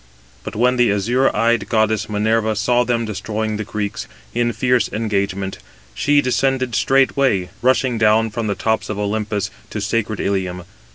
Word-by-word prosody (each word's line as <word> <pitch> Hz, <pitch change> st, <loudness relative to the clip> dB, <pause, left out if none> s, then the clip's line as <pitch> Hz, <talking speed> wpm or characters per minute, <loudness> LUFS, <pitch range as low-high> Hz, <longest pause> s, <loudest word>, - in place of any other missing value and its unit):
But -, -, -7 dB
when 125 Hz, +3 st, +2 dB
the 120 Hz, -4 st, +4 dB
azure 120 Hz, +7 st, +2 dB
eyed 115 Hz, -2 st, +1 dB
goddess 110 Hz, -1 st, +1 dB
Minerva 110 Hz, +1 st, +1 dB
saw 120 Hz, +4 st, +2 dB
them 115 Hz, -1 st, 0 dB
destroying 110 Hz, +1 st, -3 dB
the 110 Hz, -, -3 dB
Greeks, 105 Hz, +1 st, -4 dB, 0.3 s
in 120 Hz, 0 st, +1 dB
fierce 125 Hz, +1 st, +1 dB
engagement, 100 Hz, -3 st, -2 dB, 0.3 s
she 145 Hz, -, +3 dB
descended 130 Hz, -1 st, 0 dB
straightway, 130 Hz, -9 st, +2 dB
rushing 130 Hz, -1 st, +2 dB
down 110 Hz, 0 st, +3 dB
from 115 Hz, 0 st, -3 dB
the 100 Hz, -, -1 dB
tops 110 Hz, +3 st, -1 dB
of 105 Hz, -, -3 dB
Olympus 105 Hz, 0 st, -2 dB, 0.2 s
to -, -, -4 dB
sacred 110 Hz, -2 st, -1 dB
Ilium. 95 Hz, -2 st, -2 dB
110 Hz, 155 wpm, -19 LUFS, 105-120 Hz, 0.3 s, the